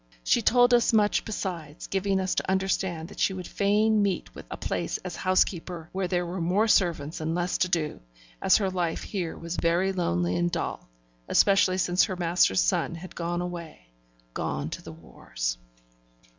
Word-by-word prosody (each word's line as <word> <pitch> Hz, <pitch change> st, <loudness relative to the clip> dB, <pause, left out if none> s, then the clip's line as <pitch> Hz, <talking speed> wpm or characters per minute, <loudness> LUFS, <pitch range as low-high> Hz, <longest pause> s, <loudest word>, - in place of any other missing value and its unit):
She 235 Hz, -, +3 dB
told 245 Hz, +2 st, +4 dB
us 240 Hz, -1 st, +4 dB
much 210 Hz, -1 st, +3 dB
besides, 175 Hz, -8 st, -5 dB
giving 195 Hz, 0 st, 0 dB
us 185 Hz, 0 st, 0 dB
to -, -, -2 dB
understand 190 Hz, -3 st, -1 dB
that -, -, -12 dB
she 190 Hz, -, +2 dB
would 185 Hz, -1 st, -6 dB
fain 210 Hz, +2 st, +2 dB
meet 200 Hz, -3 st, -1 dB
with -, -, -11 dB
a -, -, -6 dB
place -, -, -2 dB
as -, -, -5 dB
housekeeper 180 Hz, -3 st, 0 dB
where 190 Hz, -1 st, -2 dB
there 175 Hz, 0 st, 0 dB
were 175 Hz, +1 st, -4 dB
more 190 Hz, +7 st, +2 dB
servants 165 Hz, -7 st, +1 dB
and 160 Hz, +1 st, -1 dB
less 175 Hz, 0 st, -1 dB
to 180 Hz, -, +2 dB
do, 155 Hz, -4 st, -1 dB, 0.4 s
as -, -, +5 dB
her 195 Hz, -3 st, -1 dB
life 175 Hz, -3 st, -2 dB
here 180 Hz, -5 st, -4 dB
was 170 Hz, +1 st, -5 dB
very 175 Hz, +3 st, +2 dB
lonely 90 Hz, -, 0 dB
and 85 Hz, 0 st, +1 dB
dull, -, -, -4 dB, 0.4 s
especially 195 Hz, -2 st, +4 dB
since 180 Hz, 0 st, +3 dB
her 190 Hz, -, -4 dB
master's 170 Hz, -, +3 dB
son 170 Hz, -2 st, 0 dB
had 175 Hz, +2 st, -9 dB
gone 175 Hz, +1 st, -2 dB
away 170 Hz, -, -8 dB, 0.4 s
gone -, -, -3 dB
to -, -, -5 dB
the -, -, -9 dB
wars. -, -, -5 dB
180 Hz, 180 wpm, -27 LUFS, 165-195 Hz, 0.4 s, as